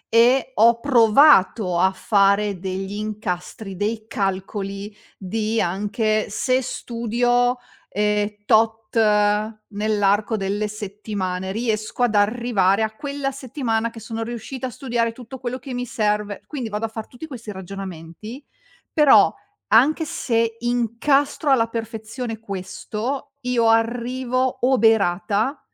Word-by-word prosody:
E 250 +3 +4
ho 230 +2 +5
provato 225 - +5
a 190 +2 +4
fare 200 0 +2
degli 190 +1 -4
incastri, 205 -1 -5
dei 215 +3 -2
calcoli 195 +1 -3 0.2
di 215 +3 -2
anche 210 +4 0
se 255 +5 +1
studio, 245 0 0 0.3
ehm, 210 0 +1 0.2
tot 220 0 +2
nell'arco 210 0 +1
delle 205 +2 -2
settimane, 200 -3 -4
riesco 220 +1 -2
ad 225 -3 +2
arrivare 205 -2 +2
a 220 - -1
quella 280 -1 -3
settimana 245 -4 -2
che 230 - -11
sono 225 +1 -5
riuscita 240 +3 -5
a - - -5
studiare 235 -2 -1
tutto 250 +2 -10
quello 250 0 -4
che 260 0 -8
mi 245 0 -3
serve. 210 -3 -1
Quindi 260 -7 -4
vado 210 +1 -2
a - - -1
far 220 0 -7
tutti 255 +6 -10
questi 230 -7 -8
ragionamenti, 190 - -8 0.5
però 300 -3 +6 0.3
anche 280 +9 +4
se 230 -5 0
incastro 245 +5 +1
alla 230 -4 +4
perfezione 225 +1 -5
questo, 210 +7 -5
io 245 -2 +1
arrivo 245 +3 +1
oberata 220 -1 +2
220 Hz, 120 wpm, -22 LUFS, 205-245 Hz, 0.5 s, però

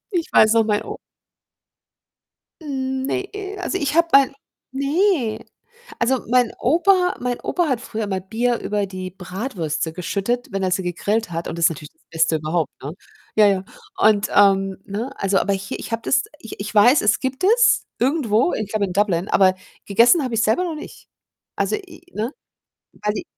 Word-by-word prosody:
Ich 350 -5 -1
weiß 220 0 +6
noch, 225 -1 +4
mein 210 -1 0
O - - -7 1.6
Ne, 265 +5 -3 0.3
also, 370 +1 -2
ich 290 -2 -2
habe 335 0 +4
mein 275 -1 +6 0.4
ne, 280 - 0 0.5
also, 250 +2 0
mein 245 -1 +3
Opa 360 +6 +3
mein 245 -1 -2
Opa 350 -2 0
hat 255 -4 0
früher 220 -4 -4
immer 190 -2 -2
Bier 230 +5 -1
über 205 -1 -1
die 185 -1 -7
Bratwürste 180 - -4
geschüttet, 200 +8 -2
wenn 195 0 -2
er 185 - 0
sie 190 - +1
gegrillt 200 +5 -1
hat 165 +1 -4
und 165 - -5
das 170 - +2
ist - - +6
natürlich 150 -2 -9
das - - -38
Beste 165 0 +2
überhaupt, 155 -1 -2
ne? 145 +4 -6 0.4
Ja, 215 - +6
ja 195 -2 +1 0.4
und, 210 -1 +4
ähm, 195 -1 +4
ne, 220 +7 -4
also, 195 0 +1
aber 200 - +1
hier 195 +1 -4
ich - - -8
habe 230 0 -2
das 270 - +2 0.2
ich 225 - -10
ich 210 +1 -5
weiß, 240 +7 +6
es 210 0 +2
gibt 265 +6 -4
es 470 +3 +4
irgendwo, 260 -1 +1
ich 215 -2 -3
glaube 210 -1 0
in 180 - -6
Dublin, 195 -2 +1
aber 190 -1 +4 0.3
gegessen 235 - +4
habe 255 -3 -3
ich's 220 -1 +1
selber 220 +12 +2
noch 340 -3 -3
nicht. 305 - -11 0.5
Also, - - 0
i - - -5
i - - -14
ne, 225 +5 -2 0.7
weil 210 0 +1
die - - -4
220 Hz, 185 wpm, -21 LUFS, 195-265 Hz, 1.6 s, weiß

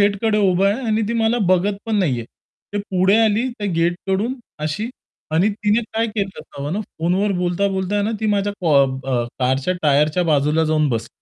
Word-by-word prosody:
गेटकडे 205 +2 +2
उभा 185 +2 +2
आहे 235 +5 -2
आणि 220 0 +1
ती - - -1
मला 230 +1 +1
बघत 185 +3 +2
पण 220 - -1
नाहीये. 130 - 0 0.5
ते 205 - -1
पुढे 195 0 +2
आली 220 +4 +1
त्या 205 - -2
गेटकडून 190 +7 0 0.3
अशी 210 +10 -3 0.5
आणि 180 +6 +4
तिने 210 +2 +1
काय 225 +1 +1
केलं 210 -3 -2
असावं 140 +3 -6
ना, 210 - -1
फोनवर 190 +2 -1
बोलता-बोलता 190 +2 0
ना 215 - 0
ती 220 - 0
माझ्या 205 -1 +1
कॉ 145 -5 +4
ब 130 0 -5 0.4
कारच्या 130 +7 +1
टायरच्या 150 +4 +3
बाजूला 150 +2 +2
जाऊन 155 -1 +2
बसली. 115 -1 -2
190 Hz, 175 wpm, -20 LUFS, 155-210 Hz, 0.5 s, आणि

